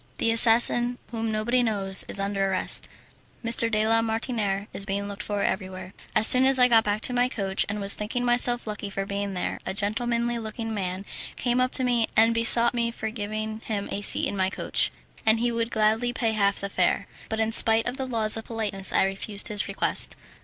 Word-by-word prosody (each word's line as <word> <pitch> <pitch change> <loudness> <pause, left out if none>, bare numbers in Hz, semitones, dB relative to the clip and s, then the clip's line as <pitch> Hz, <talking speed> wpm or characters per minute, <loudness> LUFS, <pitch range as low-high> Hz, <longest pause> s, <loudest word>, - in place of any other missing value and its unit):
The 230 - 0
assassin, 240 +1 +4
whom 225 -1 -4
nobody 230 +4 -1
knows, 200 -4 +3
is - - +1
under 195 0 -2
arrest. 190 - 0 0.6
M. 230 - -3 0.2
de 215 -1 -1
la 225 0 +2
Martiniere 220 -3 -3
is - - -5
being 200 0 -4
looked 200 0 -8
for 205 -1 -4
everywhere." 185 -1 -5 0.2
As 215 - +4
soon 255 +3 +9
as 265 0 +3
I 250 - +4
had 250 - +3
got 225 -1 +4
back 210 0 -3
to 250 - 0
my 245 0 0
coach, 195 -5 -2
and 210 +1 -4
was 200 0 +3
thinking 245 +4 -5
myself 245 0 +1
lucky 210 -1 -7
for 195 0 -5
being 200 0 -5
there, 180 - -5
a - - -6
gentlemanly 235 +3 -2
looking 225 +1 -7
young - - -5
man 190 -1 -5 0.3
came 245 0 -1
up 255 - 0
to 260 - +4
me 240 -3 0
and 225 +1 +4
besought 230 +1 +4
me 235 -1 -2
to 220 -1 -7
give 205 -2 -7
him 215 0 -6 0.3
a 200 - -4
seat - - +3
in - - -5
my 190 -1 -1
coach, - - -2 0.3
and 220 0 +2
he 240 +1 -1
would 230 0 -3
gladly 220 +2 0
pay 235 -2 -2
half 200 -2 0
the 200 - -5
fare; - - -1 0.2
but 220 - -4
in 220 0 -1
spite 225 0 +7
of 245 +2 -5
the 265 -2 -5
laws 220 -3 0
of 225 - -8
politeness 205 -4 -3
I - - +1
refused 195 +2 -4
his 210 -1 -3
request. - - +2
220 Hz, 220 wpm, -24 LUFS, 200-235 Hz, 0.6 s, soon